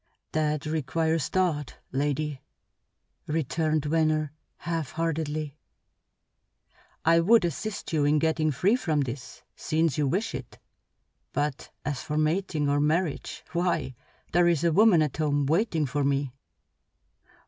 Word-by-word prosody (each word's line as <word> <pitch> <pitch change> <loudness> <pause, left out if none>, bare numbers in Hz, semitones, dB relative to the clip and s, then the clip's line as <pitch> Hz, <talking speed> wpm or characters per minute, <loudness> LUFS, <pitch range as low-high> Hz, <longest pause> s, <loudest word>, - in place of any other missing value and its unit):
"That 150 -1 0
requires 160 0 0
thought, 165 -7 -1
lady," 145 0 -1 0.9
returned 155 0 0
Venner, 155 -1 +1 0.3
half 165 -2 -3
heartedly. 155 -2 -2 1.5
"I 165 +1 +6
would 205 +3 +5
assist 195 +4 -4
you 150 -2 +2
in 150 +1 +4
getting 160 0 +1
free 180 - +2
from 155 - 0
this, 130 -1 -6
since 160 -2 0
you 145 - +2
wish 200 +11 -1
it; 130 -1 -7 0.8
but 145 0 -2 0.2
as 145 -5 -2
for 150 - -3
mating 155 -1 0
or 145 0 +2
marriage, 155 +2 -1
why, 170 -6 0 0.4
there 175 0 +4
is 170 -2 +2
a 170 - +3
woman 195 -4 +6
at 150 - -3
home 145 -2 +1
waiting 165 0 +1
for 145 +2 -1
me." 140 -1 0
155 Hz, 125 wpm, -27 LUFS, 145-165 Hz, 1.5 s, I